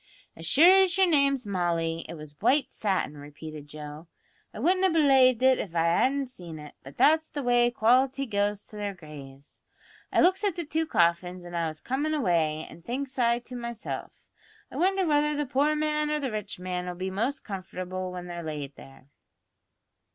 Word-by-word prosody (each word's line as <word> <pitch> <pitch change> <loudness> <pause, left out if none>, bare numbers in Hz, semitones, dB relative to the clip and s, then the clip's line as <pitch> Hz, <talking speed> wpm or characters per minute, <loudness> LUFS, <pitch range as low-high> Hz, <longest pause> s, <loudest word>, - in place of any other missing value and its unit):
"As 165 0 -6
sure 355 - +7
as 370 -2 +2
your 385 - +6
name's 280 -6 +2
Molly, 170 -4 -1
it - - -6
was 150 -2 -11
white 265 +6 +2
satin," 190 -8 -1
repeated 150 +1 -10
Joe; 150 +2 -9 0.4
"I - - -11
wouldn't 360 - +2
have 380 -3 +3
belaived 265 -5 +5
it 260 0 +5
av 175 -4 -5
I 165 - +3
hadn't 265 +11 +2
seen 175 -10 -10
it; 150 -1 -10
but 135 +1 -13
that's 315 +1 +4
the 285 - -5
way 240 -1 +4
the 240 - -15
quality 260 +4 +3
goes 205 -2 -1
to - - -15
their 205 -1 -4
graves. 145 -4 -12 0.5
I - - +3
looks 375 +4 +3
at 400 -5 +1
the 345 - -4
two 320 +2 -1
coffins 175 - +1
as 175 - -9
I 170 -1 0
was 155 -1 -6
comin' 290 +4 -1
away, 165 - +1
an' 170 - -13
thinks 260 +7 -5
I 235 -1 +3
to 245 +1 -10
myself, 235 -2 -6 0.5
I - - -7
wonder 380 +1 +2
whether 300 -1 +2
the 295 0 -1
poor 285 +3 +1
man 300 0 0
or 300 0 0
the 270 -4 -3
rich 215 -2 -5
man'll 180 -1 -4
be 185 +1 -4
most 235 +9 -2
comfortable 185 -1 -5
when 180 -1 -7
they're 175 -1 -6
laid 150 -3 -6
there?" 135 0 -15
215 Hz, 195 wpm, -27 LUFS, 170-285 Hz, 0.5 s, sure